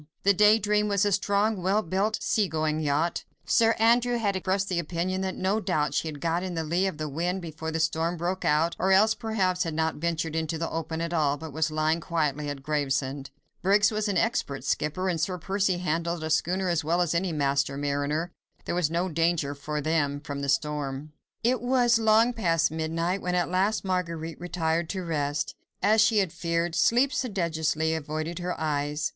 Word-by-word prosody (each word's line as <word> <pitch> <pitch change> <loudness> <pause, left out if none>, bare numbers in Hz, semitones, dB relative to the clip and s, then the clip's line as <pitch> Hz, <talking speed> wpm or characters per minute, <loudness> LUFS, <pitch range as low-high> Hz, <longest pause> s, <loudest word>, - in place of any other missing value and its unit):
The 200 - +5
Day 210 +2 +6
Dream 210 0 +1
was 200 0 +2
a 205 - +2
strong, 205 +1 +1
well 195 +4 +1
built, 195 +6 0
sea 210 -3 +2
going 155 -2 -1
yacht. 155 +3 0 0.2
Sir 225 0 +3
Andrew 240 +2 +3
had 205 -4 0
expressed 190 +1 0
the 180 -3 -1
opinion 175 +3 -2
that 190 -1 -2
no 195 +3 0
doubt 150 -8 0
she 150 - 0
had 150 -2 -6
got 165 +3 0
in 185 -1 -4
the 165 - -1
lee 175 +5 +1
of 185 - -4
the 155 0 -3
wind 175 +6 -2
before 160 -1 -5
the 160 0 -2
storm 165 +2 0
broke 180 +3 -2
out, 160 +3 +2
or 190 +1 +2
else 210 +3 +5
perhaps 200 -6 -1
had 165 -3 -1
not 160 0 0
ventured 165 0 -2
into 160 0 -1
the 165 +1 -3
open 160 0 -3
at 170 +1 -3
all, 145 -3 +1
but 160 -1 -8
was 160 +1 0
lying 155 +1 +1
quietly 150 -4 -1
at 140 -2 -6
Gravesend. 140 -2 -1 0.3
Briggs 205 +3 +4
was 215 0 -1
an 200 -3 0
expert 170 -10 -1
skipper, 185 +5 -1
and 170 -4 0
Sir 180 +2 -1
Percy 190 +1 0
handled 170 -1 -2
a 160 - -3
schooner 185 +4 +1
as 170 -3 +1
well 165 +3 +1
as 175 -2 +1
any 175 +1 0
master 140 -2 0
mariner. 145 +4 -1 0.3
There - - -2
was 175 -3 +1
no 170 +3 0
danger 165 -3 0
for 150 +2 -4
them 145 -2 0
from 145 -1 -6
the 140 - -2
storm. 145 0 -2 0.3
It 245 0 +2
was 245 -2 +3
long 225 +2 +4
past 165 -8 +1
midnight 165 +4 -1
when 180 0 -1
at 175 -1 0
last 195 +3 +1
Marguerite 170 -3 -3
retired 170 -2 -1
to 190 -2 -3
rest. 145 -3 -2 0.3
As 215 +2 +5
she 220 0 +4
had 190 -5 +1
feared, 170 0 -1
sleep 245 +9 +3
sedulously 160 - 0
avoided 155 +2 -4
her 180 0 -3
eyes. 150 -1 -1
170 Hz, 200 wpm, -27 LUFS, 155-190 Hz, 0.3 s, Day